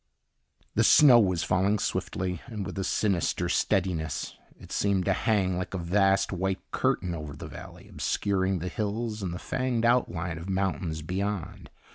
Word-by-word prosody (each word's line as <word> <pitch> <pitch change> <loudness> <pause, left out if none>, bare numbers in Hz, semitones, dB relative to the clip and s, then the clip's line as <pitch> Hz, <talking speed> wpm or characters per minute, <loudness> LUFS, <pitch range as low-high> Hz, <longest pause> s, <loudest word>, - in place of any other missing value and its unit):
The - - +3
snow 130 -6 +8
was 90 -6 +2
falling 95 +3 +2
swiftly 90 -2 -2
and 105 -5 -5
with - - -6
a - - -1
sinister 95 -3 0
steadiness. 85 -5 0 0.2
It - - -13
seemed 100 -3 +1
to 100 - +3
hang 95 -4 +1
like 90 - -4
a - - -1
vast 95 +3 +2
white 95 +1 -3
curtain 90 -1 0
over 75 -3 -6
the - - -8
valley, - - -11
obscuring 95 -1 0
the 90 +1 -4
hills 110 +2 -3
and 95 -3 -3
the 85 - -4
fanged 125 +2 -1
outline 90 -9 +1
of 85 +4 -8
mountains 95 -4 -1
beyond. 95 +2 -4
95 Hz, 160 wpm, -28 LUFS, 90-105 Hz, 0.2 s, snow